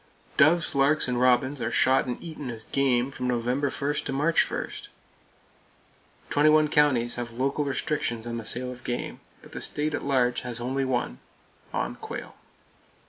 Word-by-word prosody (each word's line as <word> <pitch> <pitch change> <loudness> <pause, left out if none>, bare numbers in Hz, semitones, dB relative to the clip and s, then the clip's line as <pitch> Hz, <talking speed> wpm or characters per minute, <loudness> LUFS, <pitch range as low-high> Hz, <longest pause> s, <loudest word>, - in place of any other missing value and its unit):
Doves, 160 +3 +4
larks 140 +2 +3
and 125 -1 -1
robins 130 +2 +3
are 110 - 0
shot 130 +2 +3
and 125 - -3
eaten 155 -5 -6
as 115 -2 -6
"game" 130 -1 +1
from 125 -1 -4
November 125 +3 0
1 145 +1 -2
to - - -3
March 150 +5 +2
1! - - -3 1.6
Twenty 145 +1 +4
one 155 0 +4
counties 135 -6 +3
have 120 - -5
local 135 +4 0
restrictions 135 -4 -2
on 115 0 -4
the 115 - -5
sale 125 +3 +2
of 125 0 -11
game, 120 0 -4 0.2
but - - -14
the - - -6
state 150 +1 0
at - - -2
large 125 -3 +1
has 125 -2 -4
only 135 +3 -1
one,—on 120 - -5
quail. - - -7
130 Hz, 165 wpm, -26 LUFS, 120-145 Hz, 1.6 s, Doves